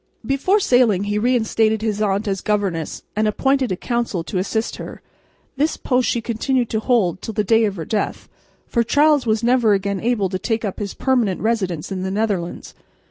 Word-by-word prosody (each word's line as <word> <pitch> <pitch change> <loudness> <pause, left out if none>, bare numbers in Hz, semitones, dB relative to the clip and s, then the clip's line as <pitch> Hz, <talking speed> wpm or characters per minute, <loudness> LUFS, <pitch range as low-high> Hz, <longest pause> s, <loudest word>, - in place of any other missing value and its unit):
Before 275 +10 +2
sailing 245 - +3
he 205 +1 -1
reinstated 220 -2 +1
his 215 -2 -1
aunt 205 +1 0
as 195 -1 -1
governess, 195 -7 -2
and 215 +1 +1
appointed 265 +3 +1
a - - +1
council 235 -4 -2
to 185 +2 -3
assist 220 +4 -2
her. - - -9 0.5
This 300 +3 +1
post 250 -1 +1
she 235 - 0
continued 240 +2 -1
to 220 - 0
hold 210 -7 +1
till 220 - -6
the 210 - +1
day 225 +2 +3
of 205 -2 -2
her 165 -4 -5
death, 210 +3 -2 0.4
for 235 - 0
Charles 290 +1 +3
was 220 +1 +1
never 240 -3 +4
again 200 0 -1
able 225 -3 +1
to 185 0 -3
take 225 +1 -1
up 195 - -4
his 205 -2 -4
permanent 240 -8 +1
residence 195 -8 -1
in 190 -1 -3
the 190 - -2
Netherlands. 195 -4 -2
220 Hz, 190 wpm, -20 LUFS, 195-240 Hz, 0.5 s, never